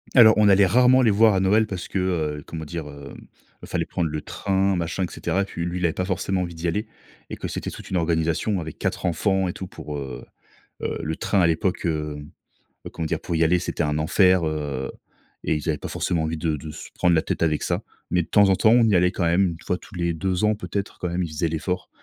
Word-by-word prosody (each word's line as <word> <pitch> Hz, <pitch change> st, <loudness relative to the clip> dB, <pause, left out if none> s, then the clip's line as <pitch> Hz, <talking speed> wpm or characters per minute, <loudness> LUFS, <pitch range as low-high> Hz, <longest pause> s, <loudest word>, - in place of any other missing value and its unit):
Alors, 110 Hz, -3 st, +8 dB
on 105 Hz, -1 st, +5 dB
allait 100 Hz, 0 st, +6 dB
rarement 125 Hz, +6 st, +5 dB
les 110 Hz, -, +5 dB
voir 110 Hz, 0 st, +5 dB
à -, -, +2 dB
Noël 105 Hz, +3 st, +3 dB
parce 95 Hz, -4 st, -5 dB
que, 95 Hz, -, -2 dB, 0.4 s
heu, -, -, -12 dB
comment 80 Hz, -1 st, -6 dB
dire? 80 Hz, -1 st, -5 dB
Hem, 70 Hz, -1 st, -11 dB, 0.4 s
fallait -, -, -2 dB
prendre 85 Hz, -2 st, -2 dB
le 75 Hz, 0 st, -4 dB
train, 95 Hz, -1 st, 0 dB
machin, 85 Hz, +2 st, -2 dB
et 85 Hz, -, -3 dB
cetera. 100 Hz, +1 st, -1 dB
Puis 85 Hz, -3 st, -5 dB
lui, 90 Hz, +1 st, -3 dB
il 90 Hz, -, 0 dB
avait 80 Hz, -, +1 dB
pas 90 Hz, -, -2 dB
forcément 95 Hz, 0 st, -1 dB
envie 85 Hz, -2 st, -4 dB
d'y 85 Hz, +1 st, -3 dB
aller 105 Hz, +6 st, -1 dB, 0.4 s
et -, -, -4 dB
que -, -, -5 dB
c'était -, -, -4 dB
toute -, -, -10 dB
une 95 Hz, -, +1 dB
organisation 85 Hz, +4 st, 0 dB
avec 80 Hz, -1 st, -7 dB
4 -, -, -2 dB
enfants 95 Hz, +2 st, +1 dB
et -, -, -4 dB
tout 95 Hz, -, -7 dB
pour, 75 Hz, -3 st, -7 dB
heu, 65 Hz, -3 st, -7 dB, 0.6 s
heu, -, -, -2 dB
le 80 Hz, 0 st, -3 dB
train 100 Hz, -, 0 dB
à 85 Hz, -, +5 dB
l'époque, 90 Hz, +3 st, 0 dB
heu, 75 Hz, -2 st, -2 dB, 0.7 s
heu, -, -, -6 dB
comment 80 Hz, -, -5 dB
dire? -, -, -1 dB
Pour 85 Hz, -, -3 dB
y 80 Hz, -, +3 dB
aller, 90 Hz, +2 st, +3 dB
c'était 85 Hz, -, -2 dB
un 75 Hz, 0 st, 0 dB
enfer, 90 Hz, +2 st, +4 dB
heu, 70 Hz, -4 st, -3 dB, 0.5 s
et 80 Hz, -, +1 dB
ils 75 Hz, +2 st, -3 dB
avaient 75 Hz, -, +1 dB
pas -, -, -7 dB
forcément 85 Hz, -3 st, -1 dB
envie 80 Hz, 0 st, -2 dB
de 80 Hz, -1 st, 0 dB
de 75 Hz, +1 st, -7 dB
se -, -, -10 dB
prendre 90 Hz, -1 st, +3 dB
la 80 Hz, -, +3 dB
tête -, -, -2 dB
avec 75 Hz, -2 st, +1 dB
ça. -, -, -1 dB, 0.3 s
Mais 90 Hz, -1 st, +2 dB
de -, -, -14 dB
temps 100 Hz, -2 st, +5 dB
en 95 Hz, -, +4 dB
temps, 110 Hz, -, +4 dB
on 120 Hz, -1 st, +6 dB
y 100 Hz, -, +3 dB
allait 90 Hz, +1 st, +4 dB
quand 85 Hz, -, -1 dB
même 90 Hz, +2 st, +3 dB
1 85 Hz, 0 st, -8 dB
fois 90 Hz, -, 0 dB
tous 95 Hz, -, -15 dB
les 85 Hz, -1 st, 0 dB
2 90 Hz, +4 st, -1 dB
ans, 105 Hz, 0 st, +3 dB
peut-être 100 Hz, -2 st, -4 dB
quand 90 Hz, -, -2 dB
même, 90 Hz, +1 st, -1 dB
ils 85 Hz, -, -4 dB
faisaient 80 Hz, +2 st, -1 dB
l'effort. 85 Hz, +3 st, -3 dB
85 Hz, 260 wpm, -24 LUFS, 80-95 Hz, 0.7 s, Alors